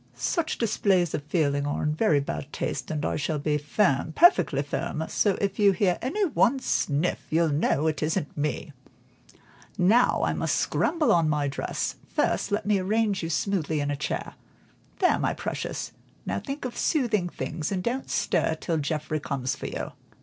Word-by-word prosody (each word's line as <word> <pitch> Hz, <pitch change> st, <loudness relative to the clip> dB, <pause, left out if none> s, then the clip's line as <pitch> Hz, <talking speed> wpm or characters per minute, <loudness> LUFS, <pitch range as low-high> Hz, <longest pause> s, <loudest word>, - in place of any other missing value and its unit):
Such 335 Hz, -4 st, -1 dB
displays 195 Hz, -6 st, +2 dB
of -, -, -1 dB
feeling 145 Hz, -3 st, +1 dB
are 145 Hz, -, -2 dB
in 150 Hz, -, +1 dB
very 155 Hz, -3 st, +3 dB
bad 140 Hz, +1 st, -5 dB
taste, -, -, -3 dB
and 150 Hz, -2 st, -2 dB
I -, -, 0 dB
shall 150 Hz, +1 st, -1 dB
be 150 Hz, +1 st, 0 dB
firm, 150 Hz, -1 st, +1 dB
perfectly 160 Hz, -, +5 dB
firm, 155 Hz, +2 st, -3 dB
so 205 Hz, -3 st, +1 dB
if 200 Hz, 0 st, -1 dB
you 200 Hz, -1 st, +6 dB
hear 180 Hz, -1 st, +1 dB
any 390 Hz, -, 0 dB
one 275 Hz, -, +3 dB
sniff 160 Hz, -, 0 dB
you'll 165 Hz, +1 st, +2 dB
know 145 Hz, 0 st, +1 dB
it 155 Hz, -1 st, 0 dB
isn't 155 Hz, -1 st, -1 dB
me. 150 Hz, +1 st, -3 dB, 1.0 s
Now 215 Hz, +7 st, +4 dB
I -, -, +1 dB
must -, -, 0 dB
go -, -, -1 dB
and -, -, +3 dB
scramble 330 Hz, -3 st, +1 dB
on 165 Hz, -3 st, +3 dB
my 150 Hz, -1 st, +1 dB
dress; 135 Hz, -, -3 dB
first, -, -, 0 dB
let 205 Hz, -, 0 dB
me 205 Hz, -1 st, +2 dB
arrange 205 Hz, +1 st, +1 dB
you 165 Hz, -, -3 dB
smoothly 160 Hz, -2 st, 0 dB
in 145 Hz, 0 st, -1 dB
a -, -, -1 dB
chair. 140 Hz, -, -3 dB, 0.6 s
There, 365 Hz, -, +3 dB
my -, -, 0 dB
precious, -, -, -4 dB, 0.3 s
now -, -, -1 dB
think 275 Hz, -1 st, -6 dB
of 245 Hz, -, -4 dB
soothing 225 Hz, -, +1 dB
things, 155 Hz, +3 st, -4 dB
and 185 Hz, -2 st, -1 dB
don't 255 Hz, +5 st, -2 dB
stir 160 Hz, -, +1 dB
till 165 Hz, +1 st, -2 dB
Geoffrey 155 Hz, +1 st, -2 dB
comes 135 Hz, -2 st, -2 dB
for -, -, -6 dB
you." -, -, -5 dB
165 Hz, 185 wpm, -26 LUFS, 150-210 Hz, 1.0 s, you